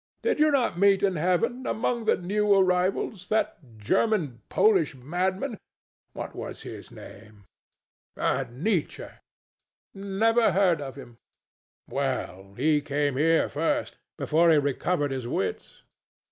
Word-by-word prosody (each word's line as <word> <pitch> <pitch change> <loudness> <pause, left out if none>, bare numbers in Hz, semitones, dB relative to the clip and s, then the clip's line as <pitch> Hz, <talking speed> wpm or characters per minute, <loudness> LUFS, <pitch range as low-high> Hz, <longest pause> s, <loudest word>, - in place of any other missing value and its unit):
Did 465 - +1
you 305 0 +5
not 255 - +1
meet 200 0 +4
in 195 -2 +2
Heaven, 185 +10 0
among 235 +1 -1
the - - +3
new 205 +3 +1
arrivals, 185 0 +1
that 220 0 0 0.2
German 145 - 0
Polish 390 - +3
madman 185 - -2 0.5
what - - -7
was - - -7
his - - -9
name? 105 -3 -14 0.7
Nietzsche? 160 - -1
THE - - -9
STATUE. - - -24 0.7
Never 215 +4 +2
heard 180 -5 +3
of 135 -2 -7
him. 120 -4 -12 0.7
THE - - -15
DEVIL. - - -8
Well, 95 +2 -3
he 150 +4 +2
came 145 -1 -1
here 160 +4 +3
first, 160 +3 -2 0.2
before 165 +2 +3
he 160 - +6
recovered 145 +1 0
his 130 -3 -4
wits. - - -4
180 Hz, 135 wpm, -26 LUFS, 145-210 Hz, 0.7 s, he